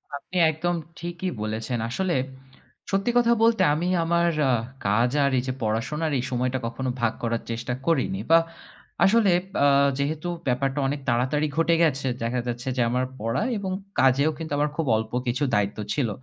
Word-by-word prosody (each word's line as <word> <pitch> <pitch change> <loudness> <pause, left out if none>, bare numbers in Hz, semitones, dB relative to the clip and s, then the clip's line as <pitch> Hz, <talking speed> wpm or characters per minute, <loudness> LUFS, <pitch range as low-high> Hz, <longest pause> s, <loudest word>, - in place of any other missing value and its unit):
আপনি 180 +5 -6
একদম 175 +3 -1 0.2
ঠিকই 175 +2 -4
বলেছেন। 110 +3 -3
আসলে 185 +8 -1 0.8
সত্যি 195 +4 +1
কথা 235 -1 +4
বলতে 230 -3 +4
আমি 165 +4 -1 0.2
আমার 170 +1 +2 0.2
আ - - +4 0.4
কাজ 115 +5 +3
আর 140 - +2
এই 125 - 0
যে 130 - -1
পড়াশোনার 130 +9 -1
এই - - -2
সময়টা 125 +1 0
কখনো 130 +2 -3
ভাগ 120 -2 +2
করার 115 0 -1
চেষ্টা 120 +2 -3
করিনি। 130 -11 +1
বা 165 - +8 0.7
আসলে 210 0 +4 0.3
আ - - +6 0.3
যেহেতু 155 +4 -2 0.2
ব্যাপারটা 135 +3 0
অনেক 145 +2 -2
তাড়াতাড়ি 130 +6 +1
ঘটে 165 0 +3
গেছে, 140 -4 +1 0.2
দেখা 120 +2 -1
যাচ্ছে 120 +1 -4
যে - - +2
আমার 125 +2 0
পড়া 115 - -1
এবং 195 -2 -3 0.3
কাজেও 135 +4 +4
কিন্তু 160 -1 -7
আমার 150 +1 +1
খুব 165 - 0
অল্প 110 0 -4 0.2
কিছু 125 +4 0
দায়িত্ব 105 -1 0 0.2
ছিল। 130 -6 0
135 Hz, 170 wpm, -25 LUFS, 120-165 Hz, 0.8 s, বা